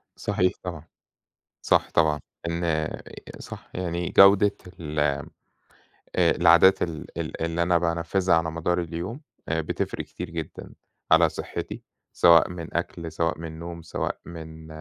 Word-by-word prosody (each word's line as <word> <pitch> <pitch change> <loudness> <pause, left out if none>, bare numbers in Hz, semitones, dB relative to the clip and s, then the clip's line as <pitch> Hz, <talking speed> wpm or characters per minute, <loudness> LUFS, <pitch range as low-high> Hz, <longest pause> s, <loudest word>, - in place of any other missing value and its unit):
صحيح 90 0 +1
طبعًا، 85 -3 -6 0.7
صح - - +2
طبعًا. 75 -2 +3 0.3
إن 85 -2 0 0.5
صح، - - -10
يعني، 85 -1 -2
جودة 100 +1 +6 0.2
ال 75 -2 -3
آآ 70 -2 +1 0.9
العادات 90 +3 +5
ال 80 -3 -5 0.3
اللي 85 +1 0
أنا 85 0 +3
بانفِّذها 85 +2 +1
على 80 0 0
مدار 85 +2 0
اليوم، 85 - -5 0.3
آآ، 80 0 0
بتفرِّق 80 - -3
كتير - - -7
جدًا - - -7 0.4
على - - +6
صحتي، - - -6 0.3
سواء 85 -1 +6
من 85 -2 -7
أكل، 85 -1 -4
سواء 85 0 -1
من 80 -1 -7
نوم، 85 0 -7
سواء 80 - -3
من 80 -1 -9
85 Hz, 130 wpm, -25 LUFS, 80-85 Hz, 0.9 s, جودة